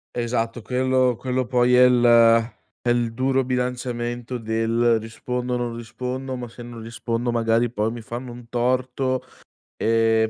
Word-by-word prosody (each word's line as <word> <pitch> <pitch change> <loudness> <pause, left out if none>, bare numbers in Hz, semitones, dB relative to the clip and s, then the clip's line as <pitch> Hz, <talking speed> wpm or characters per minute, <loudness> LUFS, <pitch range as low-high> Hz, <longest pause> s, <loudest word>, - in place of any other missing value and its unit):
Esatto 120 0 -1
quello 130 0 +1
quello 130 +1 -2
poi 125 0 +2
è 125 0 +7
il 125 -1 +4 0.8
è 120 - -1
il 120 -1 +1
duro 130 +1 +1
bilanciamento 125 -1 -2
del: 115 +1 +1
"Rispondo 125 +3 -4
non 120 -1 -3
rispondo, 130 +3 -5
ma 120 -2 -6
se 120 +1 -11
non 120 -1 -9
rispondo 115 +1 -3
magari 115 +1 +2
poi 110 -1 -1
mi 120 - -7
fanno 120 +2 -7
un 120 -1 -12
torto 130 +1 0 0.5
e 115 0 +2
120 Hz, 145 wpm, -23 LUFS, 115-125 Hz, 0.8 s, è